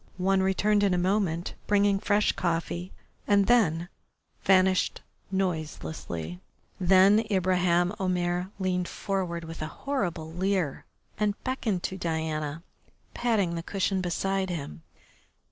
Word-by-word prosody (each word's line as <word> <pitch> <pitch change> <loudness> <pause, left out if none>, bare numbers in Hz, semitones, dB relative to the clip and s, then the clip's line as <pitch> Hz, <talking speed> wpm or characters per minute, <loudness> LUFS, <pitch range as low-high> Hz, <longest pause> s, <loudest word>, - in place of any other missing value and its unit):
One 190 +1 +2
returned 205 +2 +2
in 195 -3 +3
a - - +1
moment, 180 -2 0
bringing 200 -1 +3
fresh 210 0 +2
coffee, 175 +1 -2 0.4
and 200 -1 +4
then 175 -9 +3 0.6
vanished 185 -1 +3 0.3
noiselessly. 155 - -3 0.4
Then 190 +3 +6
Ibraheim 180 -2 +2
Omair 180 -1 0
leaned 180 -2 -1
forward 180 -4 -3
with 165 0 -8
a 155 - -2 0.2
horrible 175 - -2
leer 185 -5 -1 0.3
and 210 -1 +1
beckoned 225 -8 -1
to 190 - -3
Diana, 160 -2 -2 0.5
patting 215 -8 +1
the 165 - -3
cushions 190 +1 -1
beside 190 +2 -1
him. 140 - -5
185 Hz, 115 wpm, -28 LUFS, 170-195 Hz, 0.6 s, Then